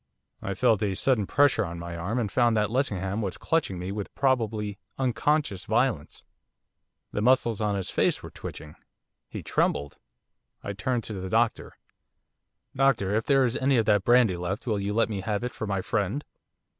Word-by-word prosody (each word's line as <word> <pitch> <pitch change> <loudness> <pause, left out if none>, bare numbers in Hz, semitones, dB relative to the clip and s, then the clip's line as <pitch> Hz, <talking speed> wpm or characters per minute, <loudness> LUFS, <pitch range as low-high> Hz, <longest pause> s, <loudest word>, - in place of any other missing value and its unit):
I 100 - -3
felt 110 -1 +3
a 100 -3 0
sudden 110 -1 +1
pressure 140 -5 +3
on 85 -3 -5
my 85 0 -6
arm, 95 +8 -3
and 110 -5 -1
found 120 -1 +3
that 105 0 +1
Lessingham 105 -6 -1
was 95 -3 -3
clutching 160 - 0
me 90 +2 -4
with 100 0 -5
probably 110 -6 0 0.2
unconscious 135 -4 0
violence. 110 - 0 0.9
The 105 - -2
muscles 120 -2 +3
of 105 -1 +1
his 95 -2 -3
face - - +1
were - - -8
twitching. 75 -1 -8 0.6
He - - -7
trembled. 70 0 -1 0.6
I 100 - -4
turned 115 +4 -1
to 110 - -6
the 95 -1 -5
doctor. - - 0 1.0
'Doctor, 130 -8 +2
if 110 +1 0
there 135 -2 +4
is 120 0 -1
any 135 0 +2
of 115 - +2
that 105 -2 +3
brandy 120 -6 +4
left 90 +5 -4
will 110 -4 0
you 100 +1 -2
let 115 +2 +2
me 105 -3 -4
have 105 +2 -2
it 125 - -2
for 110 - -5
my 100 -2 -1
friend? 105 +7 -1
105 Hz, 180 wpm, -27 LUFS, 95-125 Hz, 1.0 s, there